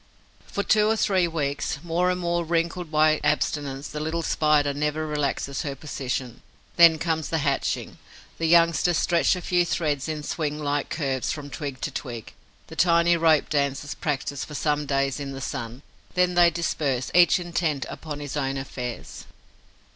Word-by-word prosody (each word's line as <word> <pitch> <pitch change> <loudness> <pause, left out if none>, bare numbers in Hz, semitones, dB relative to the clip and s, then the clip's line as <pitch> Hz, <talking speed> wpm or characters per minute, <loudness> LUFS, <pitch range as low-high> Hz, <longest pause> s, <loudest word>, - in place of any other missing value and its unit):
For 200 - -2
two 215 0 +3
or 220 - +3
three 190 -4 +2
weeks, 145 -4 -2
more 175 +2 +1
and 180 0 0
more 175 -1 0
wrinkled 170 +1 -1
by 155 0 +3
abstinence, 145 -2 -1
the 150 - -5
little 160 +2 -2
Spider 150 -2 +2
never 150 +2 -1
relaxes 145 -2 -2
her 140 -2 -4
position. 130 -3 -4 0.3
Then 170 -2 +7
comes 160 -1 -1
the 165 - 0
hatching. 140 -2 -1 0.4
The 165 - +1
youngsters 170 0 +4
stretch 170 +1 +2
a 180 - -5
few 175 -1 +2
threads 155 -4 -1
in 155 -1 -4
swing 150 -1 -2
like 145 -1 -1
curves 135 -5 -1
from 145 -3 -6
twig 140 -4 -5
to 145 - -2
twig. 120 -5 -6 0.3
The - - -11
tiny 170 0 +4
rope 160 -2 +3
dancers 140 0 -1
practise 140 -1 -3
for 150 - -8
some 150 0 0
days 135 0 0
in 140 -1 -5
the 135 - -6
sun; 120 0 -5 0.3
then 180 0 +3
they 175 -1 +6
disperse, 145 -7 -1
each 175 -1 +6
intent 170 -5 -1
upon 150 -2 -7
his 145 -1 -5
own 135 -2 -1
affairs. 125 -3 -6
150 Hz, 170 wpm, -25 LUFS, 140-170 Hz, 0.4 s, Then